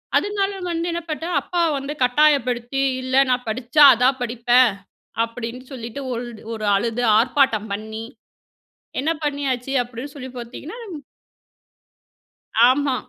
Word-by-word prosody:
அதுனால, 405 -1 +1 0.2
வந்து 335 0 -2
என்ன 340 0 -3
பண்ணிட்டேன் 325 +3 -2
அப்பா 350 -1 -2 0.2
வந்து 275 +2 -4
கட்டாயப்படுத்தி, 255 -2 +2 0.2
"இல்ல, 260 0 -2
நான் 250 0 0
படிச்சா 255 +6 +3
அதான் 255 +3 +2
படிப்பேன்" 245 +1 +3 0.5
அப்டின்னு 230 +2 -6
சொல்லிட்டு 240 +1 -7
ஒல்டு 235 -2 -6
ஒரு 215 -1 -4
அழுது 230 +4 -1 0.2
ஆர்ப்பாட்டம் 230 -4 +2
பண்ணி, 220 +2 -6 1.0
என்ன 300 +4 0
பண்ணியாச்சு 275 -3 -2
அப்டின் 245 +4 -9
சொல்லி 260 -2 -7
பார்த்தீர்கன்னா, 250 - -8 1.9
ஆமா. 270 +1 +2
255 Hz, 115 wpm, -21 LUFS, 235-285 Hz, 1.9 s, படிச்சா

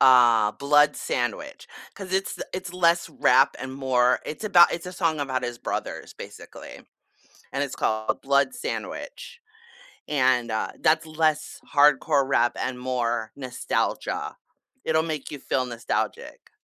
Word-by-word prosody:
uh, 120 -5 +6
Blood 145 +1 +3
Sandwich, 120 -4 -3 0.3
'cause 190 -2 -8
it's 190 0 0
the - - -6
it's 185 -1 -5
less 170 -1 +2
rap 125 - +3
and 130 0 -6
more 130 -2 +2
it's 155 - -6
about 175 -4 +6
it's 170 +1 -5
a 180 - -6
song 165 -4 0
about 130 -2 -2
his 120 -1 -5
brothers - - -5
basically, - - -11 0.7
and 140 +1 -1
it's 135 - -7
called 110 0 -1
Blood 140 - +2
Sandwich, 470 - -6 0.7
and, 130 -5 +2
uh, 110 - -2
that's 155 0 +2
less 155 -1 -1
hardcore 145 -1 +4
rap 120 -3 +2
and 130 -1 -3
more 120 -3 -2
nostalgia. 130 -3 -3 0.5
It'll 160 0 +2
make 155 -4 -4
you 145 - -7
feel 130 0 -1
nostalgic. 120 -1 -4
140 Hz, 140 wpm, -25 LUFS, 125-160 Hz, 0.7 s, uh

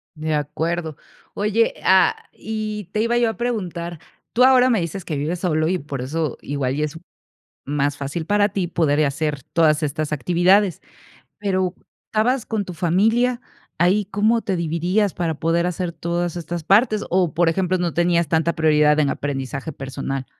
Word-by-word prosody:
De 155 0 -2
acuerdo. 155 +2 -2 0.4
Oye, 210 +2 +1
ah, 190 0 +5 0.2
y 215 -1 -4
te 215 - 0
iba 235 +1 +1
yo 240 -1 +3
a 225 - -6
preguntar. 175 -9 -3 0.3
Tú 245 - +4
ahora 255 -1 +6
me 225 -6 +2
dices 170 +2 -5
que 155 - -3
vives 155 +5 -2
solo, 155 -3 +1
y 185 +2 +1
por 140 -5 -6
eso 150 +2 -2
igual, 135 -2 -2
y 150 - -1
es 150 +1 -4 0.7
más 145 0 -1
fácil 145 +4 -4
para 205 +1 +3
ti 185 -3 -2
poder 155 -3 +1
y - - +4
hacer 145 0 -2
todas 155 +1 +2
estas 150 +1 -2
actividades. 180 +6 +2 0.6
Pero 190 -3 0 0.3
estabas 235 +3 0
con 215 -3 -2
tu 180 - -7
familia, 225 +9 +2 0.4
¿ahí 190 +4 +3
cómo 210 +4 +1
te 195 - -2
dividías 175 +4 0
para 170 -2 -1
poder 165 +1 +1
hacer 180 0 -2
todas 170 +1 -2
estas 170 0 -5
partes? 210 - +3
O, 180 -4 +1
por 170 0 +3
ejemplo, 185 +2 0
no 175 -2 -1
tenías 170 -1 +2
tanta 165 +1 +1
prioridad 150 -2 +3
en 145 - +2
aprendizaje 140 +1 -4
personal. 135 0 -5
170 Hz, 170 wpm, -21 LUFS, 155-200 Hz, 0.7 s, ahora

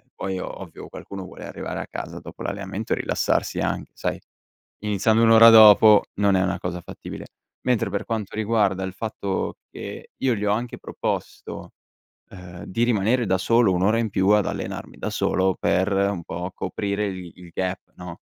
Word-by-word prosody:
poi 95 -1 -3
ovvio - - -8
qualcuno 100 -1 -8
vuole 90 - -10
arrivare - - -5
a - - -6
casa - - -6
dopo - - -10
l'allenamento 100 +2 -3
e - - 0
rilassarsi - - 0
anche, - - -2
sai? - - -3 0.6
Iniziando 105 +2 +2
1 115 - +5
ora 115 +1 +9
dopo 110 -1 +8
non 100 -1 +2
è 95 - +2
una 95 +1 0
cosa 90 0 -4
fattibile, 85 - -9 0.4
mentre 125 -6 +2
per 100 +1 -2
quanto 110 -4 -4
riguarda 105 -3 +1
il 95 - -4
fatto 100 -3 -3
che - - -8
io 130 -2 +1
gli 105 -1 -3
ho 100 - +2
anche 120 +3 -3
proposto, - - -5 0.6
ehm, 90 -2 -10
di 115 +5 -2
rimanere 120 +1 +2
da 95 -1 +2
solo 115 +2 +3
1 90 0 0
ora 105 +4 +3
in 115 -2 -1
più 95 0 +1
ad 105 -1 +4
allenarmi - - -5
da - - -3
solo 95 0 +1
per 95 +3 +1
un 100 -2 0
po' 90 +3 -5
coprire 100 +1 -2
il 95 -3 -6
il 90 -1 -13
gap 95 0 -1 0.2
no, 90 -2 -9
100 Hz, 180 wpm, -24 LUFS, 95-110 Hz, 0.6 s, ora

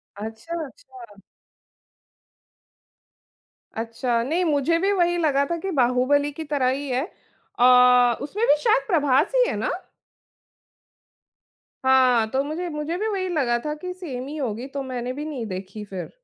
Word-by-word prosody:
अच्छा, 220 +11 -7
अच्छा। 370 - -14 2.6
अच्छा, 230 +1 -1
नहीं 325 +8 0
मुझे 305 +1 +2
भी 390 +3 +1
वही 350 -3 +2
लगा 285 -4 +2
था 340 +3 -2
कि 385 +3 -4
बाहुबली 265 +1 +2
की 315 +3 -7
तरह 290 -4 0
ही 275 +2 -2
है। 255 +1 0 0.6
अ, 250 -1 +6
उसमें 395 +11 -2
भी - - +6
शायद 470 +2 +2
प्रभास 290 - +2
ही - - +5
है - - -2
ना? - - -1 2.1
हाँ, 255 -4 +4
तो 265 +1 +1
मुझे 315 +5 -4
मुझे 300 +2 -3
भी 430 +3 -2
वही 390 -3 -2
लगा 265 -8 +1
था 300 - -1
कि 365 0 -5
सेम 275 -9 -6
ही 300 +2 -6
होगी 245 -3 -3
तो 280 0 -5
मैंने 250 -1 -4
भी 295 +3 -6
नहीं 280 -7 -5
देखी 195 +2 -7
फिर। 190 -3 -7
280 Hz, 150 wpm, -23 LUFS, 250-335 Hz, 2.6 s, अ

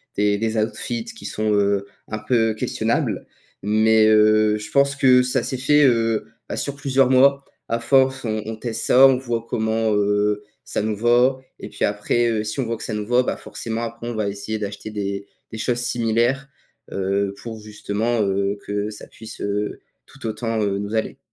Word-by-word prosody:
des 105 0 +2
des 110 +1 -1
outfits 225 - -2
qui 225 0 -10
sont, 110 0 -1
heu, 100 -1 +2 0.2
un 110 - -4
peu 115 0 +1
questionables 110 - -1 0.4
mais 110 +1 +4
heu, 110 0 +4
je 105 0 -8
pense 140 0 +3
que 130 -2 +5
ça 125 0 0
s'est 130 - -3
fait, 145 +3 +4
heu, 115 -4 +2 0.2
bah - - -4
sur 140 - -3
plusieurs 135 -2 +2
mois. 140 +2 +5 0.2
À 115 - -1
force, 135 +1 +3
on 110 -2 -2
on 110 - -4
teste 115 0 -4
ça, 130 +2 +7
on 135 -1 +5
voit 120 -3 -3
comment, 110 0 0
heu, 105 0 +1 0.2
ça - - -2
nous 110 0 -1
va 120 +4 +3 0.2
et - - -7
puis - - -5
après, 105 +3 +1
heu, 110 -2 0
si 105 +6 -4
on 125 - -2
voit 115 0 -3
que - - -8
ça 110 - -4
nous 105 -1 -3
va, 125 +3 +3
bah - - -2
forcément, 115 0 -5
après 115 +1 -6
on 120 - -4
va 105 -2 -1
essayer 105 +2 -4
d'acheter 105 +1 -6
des 100 -1 -4 0.2
des 110 - -6
choses 120 +2 -1
similaires, 120 +3 0 0.5
heu, 100 +1 -1
pour 110 -2 -7
justement, 110 +2 -2
heu, 100 0 0
que 105 +1 -2
ça 105 - -10
puisse, 110 0 -11
heu, 105 +1 -2 0.2
tout 135 -2 -13
autant, 110 0 -2
heu, 100 -1 0
nous 105 +2 -4
aller. 110 - -2
110 Hz, 195 wpm, -22 LUFS, 105-120 Hz, 0.5 s, ça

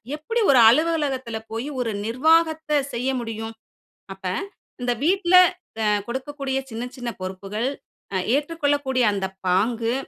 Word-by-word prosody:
எப்படி 455 +11 -2
ஒரு 260 - +6
அலுவலகத்தில 275 -5 +1
போய் 230 +5 -3
ஒரு 230 -2 -1
நிர்வாகத்த 315 +4 +2
செய்ய 250 +3 -1
முடியும்? 225 -1 -5 0.6
அப்ப 190 0 -15 0.6
இந்த 245 0 0
வீட்ல 370 0 +2 0.5
அ - - +1 0.2
கொடுக்கக்கூடிய 270 +1 -3
சின்ன 230 +2 -4
சின்ன 245 -1 -4
பொறுப்புகள், 195 +6 -3 0.4
அ 190 - +1 0.2
ஏற்றுக்கொள்ளக்கூடிய 285 -4 0
அந்த 195 -1 -2 0.2
பாங்கு, 225 +5 +1
260 Hz, 120 wpm, -23 LUFS, 225-300 Hz, 0.6 s, ஒரு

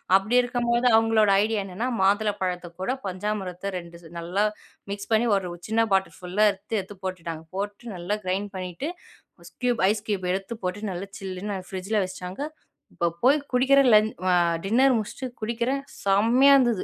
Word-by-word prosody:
அப்படி 195 +5 +2
இருக்கும்போது 245 0 +1
அவங்களோட 225 -2 +4
ஐடியா 220 -1 0
என்னன்னா, 195 +7 -3
மாதுள 205 +2 +3
பழத்த 180 -1 -2
கூட 250 +7 0
பஞ்சாமிரத்த 190 0 -3
2 170 -1 -9 0.2
நல்லா 180 +5 0 0.5
மிக்ஸ் 200 +1 -6
பண்ணி, 225 +2 +3
ஒரு 185 -2 -4 0.2
சின்ன 225 +1 +2
பாட்டல் 190 0 +1
ஃபுல்லா 185 +4 +1
எடுத்து, 205 +3 -5
எடுத்து 195 +1 -8
போட்டுட்டாங்க. 165 -3 -5
போட்டு 205 +3 -5
நல்லா 180 +5 -2
கிரைண்ட் 195 +2 -1
பண்ணிட்டு. 185 - -4 0.7
கியூப் 245 -4 +1
ஐஸ் 210 0 -1
கியூப் 195 -3 -1
எடுத்து 195 +4 -3
போட்டு 205 +3 -3
நல்லா 190 +3 -6
சில்லுன்னு 195 +1 -4
ஃப்ரிட்ஜில 195 +3 -1
வச்சுட்டாங்க. 185 +5 -7 0.5
இப்போ 170 - 0 0.2
போய் 270 +4 +6 0.2
குடிக்கிறன், 265 +1 +5
லன் 215 0 +6 0.2
அ - - +4 0.3
டின்னர் 250 +5 +4
முடிச்சுட்டு 220 +5 -4
குடிக்கிறன். 235 +5 -1 0.2
செம்மையா 230 +8 +5
இருந்தது. 240 -6 +2
205 Hz, 155 wpm, -25 LUFS, 185-230 Hz, 0.7 s, போய்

